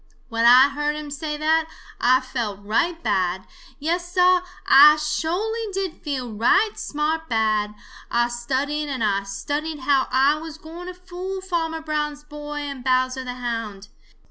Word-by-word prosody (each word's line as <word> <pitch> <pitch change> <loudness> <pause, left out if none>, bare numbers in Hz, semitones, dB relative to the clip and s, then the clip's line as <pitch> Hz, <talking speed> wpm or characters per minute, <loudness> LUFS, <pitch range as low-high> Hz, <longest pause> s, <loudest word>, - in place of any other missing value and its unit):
"When 230 0 0
I 255 +3 +8
heard 295 +1 -2
him 300 -1 -7
say 300 +1 -4
that, 315 +1 +2 0.3
Ah 255 +2 +4
felt 220 -6 -4
right 330 +11 0
bad. 190 -3 0 0.3
Yes, 345 +4 -2
Sah, 365 0 +4 0.3
Ah 295 +3 +8
sho'ly 360 +9 -2
did 385 -3 -4
feel 260 -6 -4
right 250 - +3
smart 315 +2 -2
bad. 215 -2 +1 0.3
Ah 240 0 +2
studied 270 +5 -2
and 260 -4 -2
Ah 200 -2 +1
studied 290 +10 -4
how 270 0 +2
Ah 275 +4 +3
was 320 -1 -8
gwine 330 +3 -10
to 365 - -7
fool 365 +1 -6
Farmer 330 -4 -2
Brown's 300 -1 -3
boy 295 0 -7
and 280 -3 -6
Bowser 255 0 +1
the 250 -1 -5
Hound. 230 -5 -5
295 Hz, 155 wpm, -23 LUFS, 245-320 Hz, 0.3 s, I